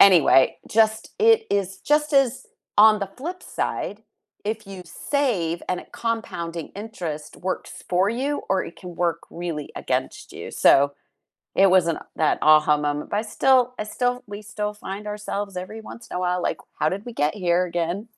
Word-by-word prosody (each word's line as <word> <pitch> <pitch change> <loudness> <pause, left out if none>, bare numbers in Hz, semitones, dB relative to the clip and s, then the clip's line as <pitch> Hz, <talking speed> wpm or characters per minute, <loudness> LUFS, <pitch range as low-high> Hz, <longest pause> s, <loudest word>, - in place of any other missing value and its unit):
Anyway, 170 -8 +6
just 220 0 +2
it 450 0 +6
is 195 -1 0
just 300 0 +2
as 265 -2 +2 0.3
on 215 0 +7
the 200 - -2
flip 355 +7 -6
side, - - -3 0.4
if 215 0 -3
you 195 -2 -8
save 180 - -1
and 180 - 0
a - - -14 0.2
compounding 170 -8 -3
interest 170 -9 -6
works 185 +1 -5
for 185 +2 +3
you 275 +5 -1
or 190 -1 +2
it - - -9
can 180 -2 -9
work 170 -2 0
really 165 -4 -5
against - - -3
you, - - -7
so, 140 +1 +5 0.6
it 195 0 +6
wasn't 170 -3 +4 0.2
that 155 - +2
a-ha 155 -1 +6
moment, 145 0 -2
but 205 - 0
I - - +2
still 250 +3 +3
I - - 0
still 245 +4 -1
we 205 0 -7
still 210 0 -4
find 205 0 -7
ourselves 205 -2 -4
every 215 +5 -6
once 230 +1 -11
in - - -6
a - - -1
while, 180 0 0
like, - - -1 0.2
"How 155 - +3
did 195 +4 -4
we 240 - -6
get 150 -6 +1
here 180 -2 +2
again?" 175 +5 -2
195 Hz, 180 wpm, -24 LUFS, 170-220 Hz, 0.6 s, on